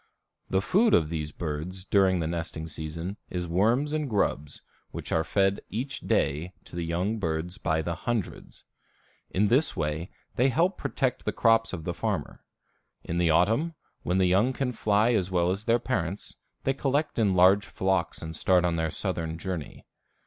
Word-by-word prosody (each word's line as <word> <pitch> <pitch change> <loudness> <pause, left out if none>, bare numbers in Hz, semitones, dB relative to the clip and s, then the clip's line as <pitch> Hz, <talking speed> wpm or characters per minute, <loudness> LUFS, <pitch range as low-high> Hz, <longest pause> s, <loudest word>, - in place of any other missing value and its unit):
The 95 +1 +1
food 215 - +4
of 75 - +2
these 75 -2 -3
birds 85 +4 -5
during 95 -3 +3
the - - -1
nesting 80 -1 -4
season 80 +5 -5
is 90 -1 -3
worms 115 - +2
and 155 -3 -1
grubs, 75 - -1 0.3
which - - -7
are 80 - +2
fed 95 +2 +1
each 135 +6 -3
day 80 +6 0
to - - -13
the 85 - -2
young 90 +7 -1
birds 85 0 -3
by 80 0 0
the 85 - -2
hundreds. 110 +2 -4 0.7
In 105 +3 +2
this 140 +5 +3
way 80 +2 -2 0.3
they 130 +3 +4
help 170 +8 +2
protect 135 -4 -1
the - - -1
crops 115 -1 +3
of 80 - -5
the - - -2
farmer. - - -3 0.6
In 85 +1 -2
the 85 -1 +3
autumn, 115 - +2 0.3
when 90 - 0
the 95 - +4
young 100 +8 +3
can 130 -1 -1
fly 110 0 +2
as 95 -5 +1
well 90 -1 +2
as 100 +4 -4
their 115 0 +4
parents, 100 -7 -3 0.3
they 135 - +2
collect 140 0 0
in 100 -4 +3
large 95 +3 +5
flocks 95 -3 -1
and 80 0 -6
start 90 +2 +3
on 85 -1 +1
their 80 0 0
southern 80 -2 -3
journey. 85 -3 -6
95 Hz, 180 wpm, -27 LUFS, 85-115 Hz, 0.7 s, large